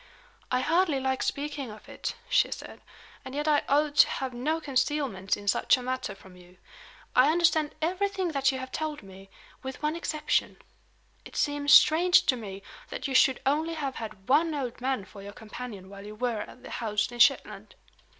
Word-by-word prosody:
"I 255 0 +1
hardly 330 -1 +2
like 265 0 -1
speaking 285 -2 -3
of 210 0 -12
it," - - -5
she - - +3
said. - - -8 0.4
"And 260 +1 -8
yet 295 +1 -2
I 300 -1 +4
ought 290 +1 +2
to - - +8
have 265 -2 -4
no 300 +7 -1
concealments 270 -9 -1
in 205 - -11
such 200 - +3
a 250 - -7
matter 255 -4 -3
from 190 -2 -16
you. 180 0 -18 0.6
I 255 +3 +6
understand 325 -3 +2
everything 375 +2 0
that 275 -3 +2
you 265 - -4
have 260 0 -7
told 310 -4 -4
me 195 0 -13 0.3
with 265 +2 -7
one 305 +1 0
exception. 310 -2 -1 0.7
It - - -13
seems 290 -1 0
strange 350 +3 +6
to 260 - +3
me 200 -4 -8 0.3
that - - -4
you 270 - -4
should 260 0 +4
only 315 +4 +1
have 280 -4 -4
had 215 -4 -8
one 310 +4 +3
old 250 -4 -4
man 255 -6 -1
for 200 +1 -13
your 200 +1 -9
companion 215 -3 -9
while 200 0 -11
you 210 +1 -9
were 235 -1 -2
at 250 - -11
the - - -10
house 215 -1 -1
in 240 - -9
Shetland." - - +2
265 Hz, 190 wpm, -28 LUFS, 215-300 Hz, 0.7 s, to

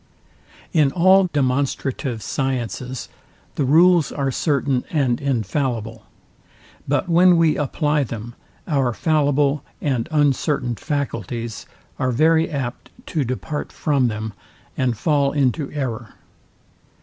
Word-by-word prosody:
In 150 -5 +4
all 190 +2 +5
demonstrative 135 -3 -1
sciences 130 -2 -3 0.5
the 145 - -1
rules 170 +3 +5
are 135 -2 -1
certain 140 -2 0
and 135 -6 0
infallible; 115 -3 -2 0.8
but 145 +6 0
when 175 +1 +5
we 165 -2 +3
apply 150 +1 0
them, 115 0 -7 0.3
our 135 -7 +1
fallible 145 -2 +1 0.2
said 130 -6 -1
uncertain 145 -4 +1
faculties 115 - -4 0.3
are 130 - +1
very 160 +5 +3
apt 135 -6 -4 0.2
to 155 - 0
depart 130 +4 -4
from 140 -4 +1
them, 110 -1 -4 0.4
and 125 -3 0
fall 140 +1 +1
into 140 0 0
error. 120 -6 -4
140 Hz, 110 wpm, -21 LUFS, 125-150 Hz, 0.8 s, all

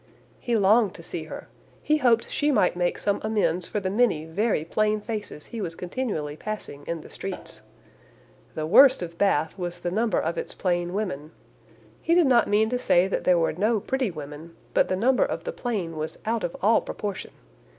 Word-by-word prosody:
"He 235 -2 0
longed 210 0 +4
to - - -11
see - - -6
her. - - -8 0.4
He 305 - +3
hoped 235 -4 +3
she 295 - +1
might 205 -9 +3
make 175 0 0
some 200 -1 -1
amends 190 -6 0
for 210 - -2
the 190 -1 -2
many 205 -8 +2
very 170 0 0
plain 215 +4 +1
faces 210 -8 -6
he 230 - -6
was 165 -4 -4
continually 180 - -3
passing 210 -7 -6
in 170 -1 -3
the - - -13
streets. - - -7 0.9
The 155 - -2
worst 255 - +6
of 170 -1 -8
Bath 160 -6 +2
was 175 -1 -4
the 175 - -2
number 220 +4 +1
of 165 +2 -2
its - - -5
plain 175 -1 -1
women. 170 -8 -3 0.7
He 335 - +2
did 350 -2 +5
not 250 -3 +4
mean 210 +2 +3
to 250 - 0
say 180 -5 +3
that - - -2
there 180 -1 +5
were 165 - +1
no 215 +6 +1
pretty 260 +2 -1
women, 155 0 -9 0.2
but - - +3
the 185 - +1
number 250 +7 +3
of - - -3
the - - -4
plain 195 -9 -3
was 155 0 -5
out 225 +1 -1
of 170 - -3
all 220 +3 +5
proportion. 205 -2 -5
200 Hz, 200 wpm, -25 LUFS, 170-230 Hz, 0.9 s, worst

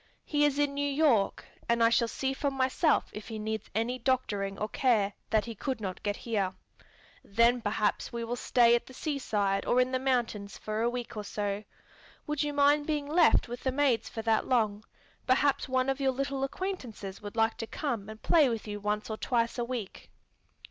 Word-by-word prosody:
He 295 -1 +2
is 285 -1 +1
in 290 -1 +1
New 285 0 0
York, 275 -8 +2 0.2
and 235 0 +3
I 230 - +6
shall 235 0 +3
see 265 +3 -2
for 280 +1 -1
myself 270 +4 +1
if 210 - -8
he 220 - -5
needs 220 0 -4
any 240 +3 0
doctoring 205 -6 -1
or 215 - -2
care 220 -6 +2 0.2
that 220 -1 +2
he 230 - -5
could 255 +3 -3
not 190 -4 -5
get 205 -1 -1
here. 200 -6 -2 0.7
Then 235 +4 +3
perhaps 210 0 0
we 235 0 -4
will 235 +1 -2
stay 240 -1 +4
at 240 - +1
the 260 - -12
seaside 210 -10 -1
or 245 - +2
in 255 0 +2
the 255 - 0
mountains 235 -6 -1
for 215 +1 -3
a 235 - +2
week 245 -1 -5
or 210 - -4
so. 205 0 -3 0.6
Would 300 -2 -1
you 295 -1 0
mind 290 +1 +3
being 300 -2 -1
left 320 +3 +4
with 245 +1 -6
the 260 - 0
maids 265 -3 +1
for 225 - -6
that 225 -1 +2
long? 215 -4 +1 0.4
Perhaps 270 +1 +2
one 255 0 +1
of 270 +1 0
your 265 -1 +2
little 275 +1 -2
acquaintances 260 - -5
would 205 0 -8
like 225 0 +2
to 225 - -5
come 230 -9 -3
and 220 0 -10
play 310 -6 +5
with 225 -2 -4
you 205 0 -4
once 210 +1 -2
or 220 - -4
twice 235 0 0
a - - +1
week." 235 -5 -6
235 Hz, 205 wpm, -30 LUFS, 215-270 Hz, 0.7 s, I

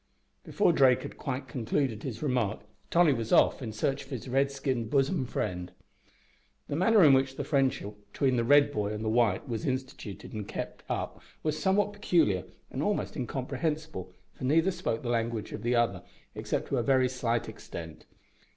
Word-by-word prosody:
Before 205 -4 +2
Drake 130 -4 +4
had - - -7
quite 130 -1 -4
concluded 125 -2 -1
his 120 -2 -5
remark 125 -7 0 0.3
Tolly 170 -4 +5
was 115 -3 -3
off - - +4
in 115 -4 -4
search 135 +6 -1
of 135 - -17
his 130 -3 -6
red 135 +2 +2
skinned 135 -4 -2
bosom 140 0 +1
friend. 90 -4 -3 1.0
The 145 - -2
manner 195 +4 +5
in 145 -3 +8
which 130 0 +2
the - - -3
friendship 135 -7 0 0.2
between 130 +1 +1
the 120 - +1
red 145 +3 +5
boy 105 -4 -1
and 105 +1 -4
the - - +1
white 115 +1 +2
was 115 -4 -3
instituted 130 -7 -5
and 105 -2 -5
kept - - -5
up - - -3 0.2
was 155 0 -1
somewhat 205 +2 +2
peculiar 165 - +2 0.3
and - - -3
almost - - -1
incomprehensible, 150 +5 -3 0.2
for - - -11
neither 165 +8 +3
spoke 175 -11 -3
the 120 - -3
language 115 -2 -1
of - - -6
the 120 +1 +1
other 115 -6 +1 0.3
except - - -3
to 135 - 0
a - - +2
very 130 +1 +3
slight 120 -2 -1
extent. 80 -2 -9
130 Hz, 180 wpm, -29 LUFS, 115-145 Hz, 1.0 s, in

